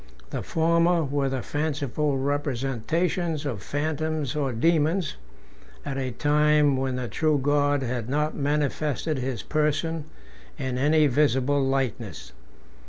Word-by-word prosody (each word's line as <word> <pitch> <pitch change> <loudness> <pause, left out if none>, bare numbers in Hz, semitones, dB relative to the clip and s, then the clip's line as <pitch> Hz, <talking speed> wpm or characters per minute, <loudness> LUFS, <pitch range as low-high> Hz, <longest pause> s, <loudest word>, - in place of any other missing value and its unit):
The - - -2
former 170 +1 +2
were 140 -1 0
the 130 -2 -3
fanciful 145 -1 -1
representations 145 +4 -1
of 120 -9 -3
phantoms 155 - -2
or 140 -3 0
daemons, 160 +6 +1 0.7
at 135 -1 -3
a 130 -1 -2
time 150 +2 +3
when 130 -1 -1
the 125 -1 -3
true 155 +7 +1
God 145 0 +2
had 120 -2 -3
not 150 +3 0
manifested 150 +1 -1
his 130 -1 -3
person 155 +1 0 0.5
in 130 -3 -2
any 150 +3 +4
visible 140 0 +2
likeness. 125 - -2
145 Hz, 120 wpm, -26 LUFS, 135-155 Hz, 0.7 s, any